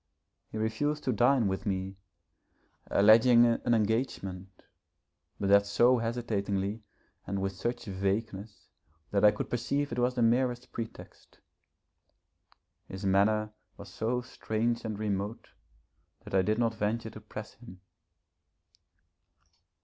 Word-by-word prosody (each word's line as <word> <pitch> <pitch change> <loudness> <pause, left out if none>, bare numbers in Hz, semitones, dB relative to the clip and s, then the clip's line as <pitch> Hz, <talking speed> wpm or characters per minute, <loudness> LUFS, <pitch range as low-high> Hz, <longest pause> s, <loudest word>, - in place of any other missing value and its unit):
He - - -5
refused 130 +8 -1
to 130 - 0
dine 120 0 +3
with 95 +2 -3
me, 95 0 -2 0.9
alleging 115 +4 +6
an 120 0 +2
engagement, 100 -5 -2 0.8
but 100 - -1
that 100 0 +5
so 120 +5 +4
hesitatingly 110 -3 -2 0.5
and 100 +1 -2
with 95 0 -1
such 120 +6 -4
vagueness 100 +1 -3 0.4
that 100 0 +1
I 105 - +9
could 105 - -3
perceive 140 +4 -1
it - - -3
was 125 +1 +1
the 120 - +1
merest 120 +1 +1
pretext. 115 -1 -9 1.5
His 95 +1 -7
manner 105 +2 +2 0.3
was 100 - -10
so 115 +6 -2
strange 115 -1 -2
and 110 -2 -3
remote 105 +1 -3 0.7
that - - -11
I 95 - +4
did 105 +4 0
not 115 -1 +1
venture 110 +2 -2
to 110 - -11
press 105 0 -9
him. 95 -6 -14
110 Hz, 125 wpm, -30 LUFS, 100-120 Hz, 1.5 s, I